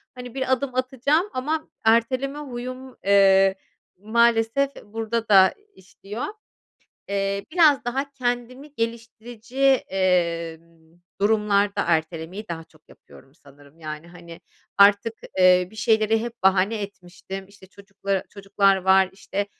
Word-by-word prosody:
hani, 250 -1 -9
bir 260 -1 -2
adım 260 0 -3
atacağım 270 - 0
ama 305 +5 -3
erteleme 255 +5 +1
huyum, 255 -1 -7
eee, 195 -1 +5 0.4
maalesef 230 +5 +2 0.2
burada 225 +1 -4
da 190 -2 +6 0.2
işliyor. 200 +4 -8 0.8
Eee, 200 0 -2
biraz 310 -7 +4
daha 270 +3 -3
kendimi 255 +3 -4
geliştirici, 230 +1 -6 0.3
eee, 170 -3 0 0.6
durumlarda 205 -1 +1
ertelemeyi 165 +5 -2
daha 165 -1 -6
çok 155 -1 -27
yapıyorum 135 - -19
sanırım, 145 0 -20
yani, 155 +1 -8
hani, 170 -1 -13 0.4
artık, 200 +3 +5 0.2
eee, 180 -1 +5
bir 220 - -16
şeyleri 220 -1 +2
hep 235 -1 -8
bahane 195 +3 +2
etmiştim. 190 0 -9
İşte, 200 -1 -17
çocukla 195 0 -4
çocuklar 195 -1 +1
var, 190 0 +3
işte, 200 +1 -4
205 Hz, 115 wpm, -23 LUFS, 190-240 Hz, 0.8 s, da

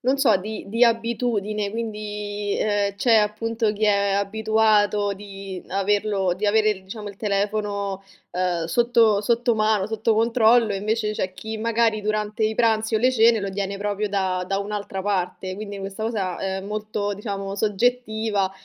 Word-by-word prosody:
non 260 +2 +2
so, 255 -7 +4
di 215 +3 -6
di 230 +4 0
abitudine 225 -3 0
quindi, 210 -2 -4
ehm, 205 -1 0
c'è 230 +3 +3
appunto 220 +1 +1
chi 215 +1 -1
è 200 -1 +3
abituato 210 0 +2
di 195 -1 -8
averlo 200 -1 +1
di 200 - -5
avere 210 -2 +2
diciamo 210 +2 -8
il 200 - -9
telefono, 200 -1 -2 0.3
ehm, 180 -2 0
sotto 225 +2 +3
sotto 235 +2 +1
mano, 215 -2 +2
sotto 220 +1 0
controllo 230 0 +4
invece 210 +2 -1
c'è 185 -3 -3
chi 220 +2 -6
magari 225 -1 +1
durante 215 +1 -2
i 215 0 +1
pranzi 225 -1 +2
o - - +4
le 255 +3 +3
cene 230 -1 +5
lo 200 -1 -3
tiene 200 0 -3
proprio 205 +1 -2
da 190 -2 0
da 195 - 0
un'altra 200 -1 -4
parte. 185 -1 -2
Quindi 205 0 -7
questa 195 +2 -6
cosa 200 -5 -2
è 190 0 -2
molto 210 0 -3
diciamo 195 -1 -5
soggettiva. 220 -1 0
210 Hz, 160 wpm, -23 LUFS, 200-220 Hz, 0.3 s, cene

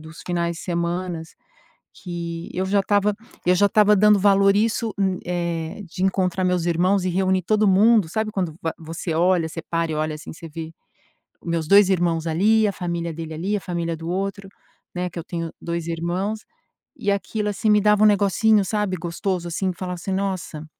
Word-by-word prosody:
dos 160 +1 -12
finais 170 -1 -1
de - - -8
semana 170 -1 -2 0.8
que 170 -2 -5
eu 185 +1 -1
já 200 +1 +2
estava 205 +1 +1 0.3
eu 180 +1 +4
já 205 +2 +4
estava 210 -1 +4
dando 210 +1 +5
valor 195 0 +5
a - - +2
isso, 225 0 0 0.3
eh, 170 +1 -3
de 180 +2 -5
encontrar 185 -1 +1
meus 180 -2 +1
irmãos 180 +3 +2
e - - +1
reunir 185 +1 +1
todo 215 +2 +2
mundo, 205 -2 +4
sabe, 220 +3 -2
quando 180 -6 -2
va 165 - -2
você 165 +1 -5
olha, 175 0 +2
você 165 +1 -7
para 165 -1 -2
e - - -2
olha 155 0 -1
assim, 150 - -9
você 165 0 -10
vê 165 +1 -7 0.7
meus 165 -2 -2
2 200 0 +7
irmãos 170 -3 +1
ali, 210 +7 +3
a - - 0
família 170 -3 -3
dele 160 -1 -6
ali, 195 +6 -1
a 205 - -2
família 170 -1 -3
do 165 +1 -7
outro, 195 +1 -3 0.5
né, 180 0 -1
que 175 - -6
eu 165 - -5
tenho 165 -2 -5
2 170 -1 -3
irmãos, 175 +6 -2 0.6
e 200 - 0
aquilo 210 +1 -2
assim 205 +2 -1
me 210 0 +5
dava 210 0 +3
um 215 - +8
negocinho, 205 +1 +3
sabe, 210 -2 -1
gostoso 175 +1 -3
assim, 185 +2 -1
falava 180 +1 -5
assim: 180 +3 -5
"Nossa". 185 -5 -3
180 Hz, 195 wpm, -22 LUFS, 170-200 Hz, 0.8 s, um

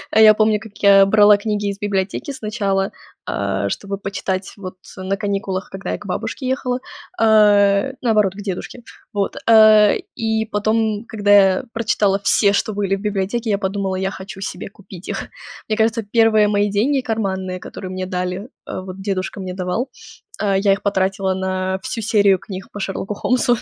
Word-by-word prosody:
Я 220 -1 +8
помню, 215 0 +2
как 220 -1 -13
я 195 -1 +7
брала 205 0 +6
книги 205 -1 -2
из 200 0 -5
библиотеки 200 +6 -2
сначала, 210 -5 -2 0.3
а, 100 0 -2
чтобы 200 - -4
почитать, 190 -1 -4
вот, 185 -2 -8 0.2
на 190 +1 -2
каникулах, 195 -2 -3
когда 195 0 -5
я - - -2
к - - -13
бабушке 260 - -4
ехала, 255 -1 -1 0.4
а, 205 -1 +5 0.2
наоборот, 210 -6 +2
к 205 - -8
дедушке. 205 +5 -6 0.3
Вот. 200 -1 -2
Э, 215 - +7 0.2
и 220 -1 -1
потом, 215 +1 0
когда 205 -2 0
я 195 +1 +5
прочитала 205 -3 +1
все, 200 +1 +4
что 210 +1 0
были 195 -1 0
в 195 - -8
библиотеке, 210 +3 -2
я 200 - +2
подумала, 195 -1 -2
я 190 +1 -2
хочу 195 +1 -9
себе 180 - -5
купить 195 -3 -13
их. - - -4 0.4
Мне 215 - 0
кажется, 225 +1 +1
первые 220 0 +3
мои 205 0 +1
деньги 250 +8 +1
карманные, 190 -6 -3
которые 185 - -8
мне 185 0 -4
дали, 180 +4 -4 0.2
э, - - -5
вот 185 0 -9
дедушка 195 0 -3
мне 185 -1 -5
давал. 185 +8 -2 0.5
Э, 200 -2 +1
я 200 -1 +3
их 195 - -4
потратила 195 -1 0
на 190 0 -2
всю 230 - -4
серию 200 -3 +3
книг 190 0 -8
по 205 - -8
Шерлоку 195 +1 -3
Холмсу. 245 +3 +1
200 Hz, 175 wpm, -19 LUFS, 190-215 Hz, 0.5 s, Я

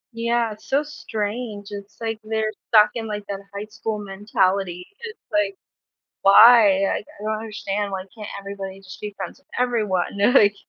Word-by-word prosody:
Yeah, 235 0 +1
it's 210 - -17
so 280 +2 +2
strange. 215 -6 -4
It's 200 0 -9
like 225 -1 -3
they're 220 0 -1 0.2
stuck 210 -1 +6
in, 225 -2 -3
like, 210 -1 -4
that 200 -1 -4
high 200 +1 -5
school 220 0 -4
mentality. 195 -2 -1
It's 460 -1 -8
like, 315 +5 +1 0.7
why? 205 -1 +8
Like, 195 - 0
I - - -9
don't 215 0 -1
understand 205 -2 -3
why 190 -1 -4
can't 210 -2 -7
everybody 195 -1 -7
just 185 -1 -11
be 210 -1 -6
friends - - -6
with 280 - -29
everyone. 210 -7 0
They're, 205 +5 +4
like 205 -6 +6
210 Hz, 175 wpm, -23 LUFS, 200-230 Hz, 0.7 s, why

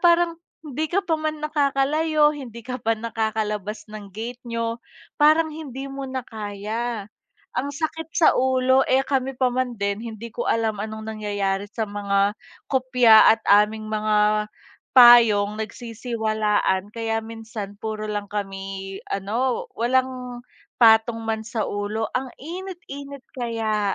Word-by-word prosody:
parang 340 -1 +3 0.2
hindi 305 +2 -3
ka 390 +4 0
pa 320 -3 0
man 310 -1 -3
nakakalayo, 300 +1 +2
hindi 235 -6 -9
ka 250 0 -5
pa 225 +1 +1
nakakalabas 215 -2 -3
ng 210 -2 -8
gate 240 +3 -5
niyo. 230 0 -2 0.4
Parang 315 +1 +5
hindi 275 -3 -7
mo 275 -1 -5
na 260 -1 -4
kaya 215 +1 -4 0.5
ang 285 - -2
sakit 320 +1 -3
sa 330 - +6
ulo. 260 0 +3
Eh, 265 +1 +3
kami 265 -1 -1
pa 255 -1 +1
man 250 -1 -1
din 200 +1 -2
hindi 230 0 -7
ko 240 - -3
alam 220 -2 0
anong 220 +1 -5
nangyayari 205 -2 -2
sa 220 +1 -3
mga 200 -1 0 0.4
kupya 250 -4 +6
at 225 - -25
aming 215 +1 +3
mga 210 0 +2 0.5
payong 225 -4 +7
nagsisiwalaan. 220 -3 -1
Kaya 225 -1 -1
minsan 220 -3 -7
puro 215 -1 -4
lang 205 -1 -3
kami, 195 -1 -5
ano, 230 +6 -1
walang 250 0 -1 0.4
patong 225 0 +5
man 220 0 -1
sa 220 -1 -2
ulo. 205 +2 -2
Ang 260 0 -3
init-init 300 -5 -8
kaya, 220 -4 -1
230 Hz, 135 wpm, -23 LUFS, 210-260 Hz, 0.5 s, payong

